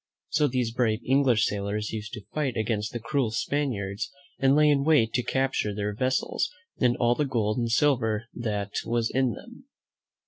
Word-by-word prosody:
So 150 Hz, -1 st, +2 dB
these 125 Hz, -3 st, -1 dB
brave 115 Hz, -2 st, +1 dB
English 130 Hz, -5 st, +3 dB
sailors 105 Hz, +1 st, -2 dB
used 105 Hz, -1 st, -6 dB
to 105 Hz, -, -7 dB
fight 140 Hz, -6 st, -1 dB
against 110 Hz, -1 st, -1 dB
the 120 Hz, -, -4 dB
cruel 120 Hz, +1 st, 0 dB
Spaniards 110 Hz, -4 st, -2 dB, 0.3 s
and 135 Hz, +1 st, +4 dB
lay 150 Hz, 0 st, +5 dB
in 145 Hz, -2 st, +3 dB
wait 140 Hz, -8 st, +3 dB
to 125 Hz, -, +2 dB
capture 130 Hz, -5 st, 0 dB
their 105 Hz, 0 st, -2 dB
vessels 130 Hz, +4 st, 0 dB, 0.3 s
and 125 Hz, -2 st, +3 dB
all 120 Hz, -1 st, +3 dB
the 150 Hz, -, 0 dB
gold 115 Hz, -4 st, 0 dB
and 120 Hz, -1 st, 0 dB
silver 115 Hz, -4 st, +2 dB
that 105 Hz, -4 st, -3 dB
was 115 Hz, 0 st, 0 dB
in 130 Hz, -3 st, +1 dB
them. 240 Hz, +4 st, -12 dB
120 Hz, 175 wpm, -27 LUFS, 110-135 Hz, 0.3 s, lay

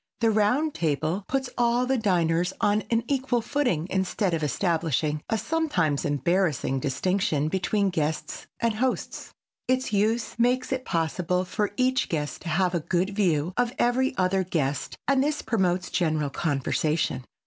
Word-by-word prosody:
The 225 Hz, -1 st, +3 dB
round 245 Hz, +9 st, +2 dB
table 160 Hz, +5 st, -1 dB
puts 270 Hz, -1 st, -1 dB
all 240 Hz, +1 st, +3 dB
the 265 Hz, +1 st, +1 dB
diners 180 Hz, -5 st, +1 dB
on 205 Hz, +1 st, +2 dB
an 230 Hz, 0 st, +1 dB
equal 265 Hz, -3 st, +1 dB
footing 230 Hz, -, 0 dB
instead 190 Hz, 0 st, 0 dB
of 165 Hz, -, 0 dB
establishing 155 Hz, -2 st, 0 dB
a 225 Hz, -, +1 dB
sometimes 210 Hz, -, 0 dB
embarrassing 145 Hz, -1 st, +1 dB
distinction 155 Hz, +1 st, 0 dB
between 195 Hz, +2 st, 0 dB
guests 155 Hz, -2 st, -3 dB
and 230 Hz, -1 st, +1 dB
hosts. 250 Hz, +4 st, -2 dB, 0.4 s
Its 255 Hz, -3 st, 0 dB
use 220 Hz, +4 st, 0 dB
makes 250 Hz, +2 st, +2 dB
it 260 Hz, -1 st, -2 dB
possible 180 Hz, +2 st, 0 dB
for 210 Hz, +3 st, -1 dB
each 255 Hz, 0 st, +1 dB
guest 150 Hz, -3 st, -3 dB
to 170 Hz, -, -5 dB
have 180 Hz, +2 st, +1 dB
a 175 Hz, -, +1 dB
good 180 Hz, +4 st, 0 dB
view 180 Hz, -5 st, +1 dB
of 245 Hz, 0 st, +1 dB
every 255 Hz, +2 st, +1 dB
other 190 Hz, +1 st, +2 dB
guest 145 Hz, -6 st, -2 dB
and 275 Hz, -1 st, +3 dB
this 300 Hz, +1 st, -1 dB
promotes 185 Hz, -5 st, 0 dB
general 155 Hz, -5 st, 0 dB
conversation. 150 Hz, -1 st, 0 dB
190 Hz, 150 wpm, -26 LUFS, 160-235 Hz, 0.4 s, The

